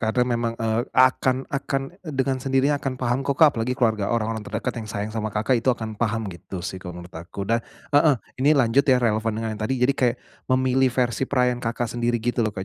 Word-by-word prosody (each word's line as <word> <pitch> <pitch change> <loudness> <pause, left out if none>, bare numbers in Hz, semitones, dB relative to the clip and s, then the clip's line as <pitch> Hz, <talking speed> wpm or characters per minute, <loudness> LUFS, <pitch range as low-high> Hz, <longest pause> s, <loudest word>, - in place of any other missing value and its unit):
Karena 110 +2 +1
memang, 120 -1 -1
eee, 115 +1 0
akan 130 0 +3
akan 135 0 -1 0.2
dengan 135 -3 -1
sendirinya 135 +2 +1
akan 130 -1 -3
paham 125 0 0
kok, 140 - 0
Kak, 160 - +7
apalagi 120 +3 -1
keluarga, 110 -6 +1
orang-orang 115 -1 -1
terdekat 115 +3 -3
yang 110 - -8
sayang 105 +1 -4
sama 110 -1 -2
Kakak 115 +3 +2
itu 125 - -2
akan 110 -2 -7
paham 115 -1 0
gitu 90 +1 -8
sih, 95 -1 -4
kalau 90 -1 -8
menurut 90 - -14
aku. 85 +4 -6
Dan 115 +3 +1 0.3
heeh, 145 -1 +5 0.2
ini 145 +3 +4
lanjut 130 +1 +3
ya, 130 - +6
relevan 110 -1 +1
dengan 110 0 -2
yang 110 - -8
tadi, 130 +5 0
jadi 130 +2 +4
kayak 125 -3 +1 0.3
memilih 130 0 +3
versi 125 0 0
perayaan 125 -2 +1
Kakak 120 0 -2
sendiri 120 0 0
gitu 120 +1 0
loh, 110 -2 +1
Kak. 95 - -4
120 Hz, 220 wpm, -24 LUFS, 110-130 Hz, 0.3 s, Kak